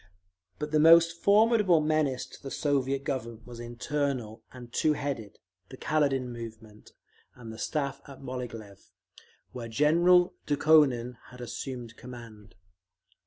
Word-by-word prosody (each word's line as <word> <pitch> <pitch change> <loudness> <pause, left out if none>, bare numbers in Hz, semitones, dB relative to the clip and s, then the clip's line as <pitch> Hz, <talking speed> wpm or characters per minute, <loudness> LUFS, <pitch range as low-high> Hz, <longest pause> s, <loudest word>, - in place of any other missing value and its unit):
But 150 0 -5
the 155 - +3
most 165 +2 +6
formidable 210 -4 +4
menace 155 -4 0
to - - -15
the 135 - -7
Soviet 140 -1 -1
Government 115 -5 -5
was 120 -1 -10
internal 120 -1 -3
and 120 -2 -12
two 155 - +2
headed—the 110 -7 -7
Kaledin 135 -5 0
movement, 110 -2 -11 0.4
and 115 -2 -10
the 110 - -11
Staff 140 -3 -3
at 140 -2 -12
Moghilev, 115 -6 -8 0.6
where 120 -2 -7
General 170 +9 +4
Dukhonin 140 -5 +3
had 125 - -14
assumed 120 -1 -7
command. 115 -5 -12
130 Hz, 120 wpm, -28 LUFS, 115-150 Hz, 0.6 s, most